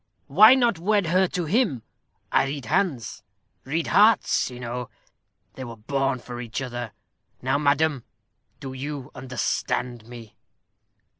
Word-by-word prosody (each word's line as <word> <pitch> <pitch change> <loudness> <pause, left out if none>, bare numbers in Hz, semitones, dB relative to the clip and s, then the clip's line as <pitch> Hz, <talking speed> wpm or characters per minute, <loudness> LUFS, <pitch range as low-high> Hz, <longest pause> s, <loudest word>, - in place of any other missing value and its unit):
Why 215 - +7
not 240 -9 +2
wed 205 +2 +2
her 185 +3 +3
to 175 -1 -3
him? 160 - +1 0.5
I - - +3
read 135 -2 -5
hands 160 - -1 0.4
read 155 +5 -1
hearts, 215 +1 +4
you 125 -1 -10
know. 120 0 -5 0.6
They 130 - -8
were 120 -2 -8
born 135 +4 -1
for 120 0 -8
each 115 -2 -5
other. 120 -4 -5 0.5
Now, 135 +2 +1
madam, 145 -2 +1 0.6
do 135 -1 -7
you 140 +1 -6
understand 125 -2 -3
me?" 120 -3 -11
135 Hz, 135 wpm, -24 LUFS, 125-165 Hz, 0.6 s, Why